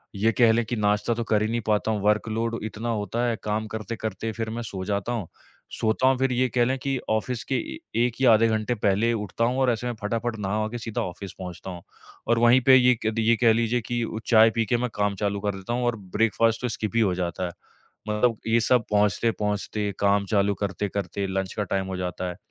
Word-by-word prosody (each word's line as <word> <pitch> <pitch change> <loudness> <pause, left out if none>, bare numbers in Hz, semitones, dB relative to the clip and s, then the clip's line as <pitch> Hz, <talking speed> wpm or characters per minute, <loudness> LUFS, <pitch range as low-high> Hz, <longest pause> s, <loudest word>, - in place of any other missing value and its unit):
ये 110 +3 +2
कह 115 +1 +4
लें 115 +1 +2
कि 120 - -3
नाश्ता 105 +1 +1
तो 115 +1 -2
कर 110 -2 +1
ही 110 - +1
नहीं 120 0 -1
पाता 105 +1 +1
हूँ, 105 -2 -1
वर्क़ 105 +2 +1
लोड 115 +1 -2
इतना 110 +2 -4
होता 115 +2 -1
है, 115 - 0
काम 105 +1 -2
करते-करते 110 0 -4
फिर 110 0 -4
मैं 115 +2 -4
सो 95 -4 -5
जाता 100 +3 -2
हूँ। 110 -7 -3 0.5
सोता 110 +4 +2
हूँ 130 0 +4
फिर 135 0 +1
ये 125 +1 +2
कह 120 -1 +4
लें 130 +2 0
कि 135 +1 -1
ऑफ़िस 115 +2 -1
के - - +3
ए 125 - -5 0.3
1 120 0 -4
या 125 -4 +7
आधे 110 +1 +4
घंटे 110 +1 0
पहले 105 +2 +2
उठता 105 0 -2
हूँ 125 +2 0
और 130 -1 +3
ऐसे 120 +1 -3
मैं 120 - -2
फटाफट 115 +2 -2
नहा-वहा 105 +2 -1
के 120 - -5
सीधा 115 -2 -3
ऑफ़िस 95 +1 -6
पहुँचता 90 0 -7
हूँ। 90 -1 -8 0.5
और 115 0 +3
वहीं 120 +2 +5
पे 130 - +9
ये 125 -1 +5
क 110 - +1
ये 115 - +5
कह 115 -2 +6
लीजिए 115 +2 +1
कि 120 +2 -2
उ 110 -1 -4
चाय 115 -1 +7
पी 115 -1 +1
के 120 +3 +1
मैं 125 +1 -1
काम 105 -1 0
चालू 100 0 -1
कर 100 0 -2
देता 95 +4 -5
हूँ 125 +1 -1
और 120 -1 +1 0.2
ब्रेकफास्ट 115 +1 +2
तो 125 - -1
स्किप 110 -1 -3
हो 95 - +1
जाता 90 0 -2
है। - - -6 0.6
मतलब 110 +2 +1
ये 115 +1 +3
सब 120 0 +3
पहुँचते-पहुँचते, 105 0 0
काम 100 0 +2
चालू 100 -1 +2
करते-करते 100 0 -3
लंच 95 0 -2
का 105 - -1
टाइम 95 0 -2
हो 95 0 -4
जाता 90 0 -3
है। 90 - -6
110 Hz, 235 wpm, -25 LUFS, 100-120 Hz, 0.6 s, पे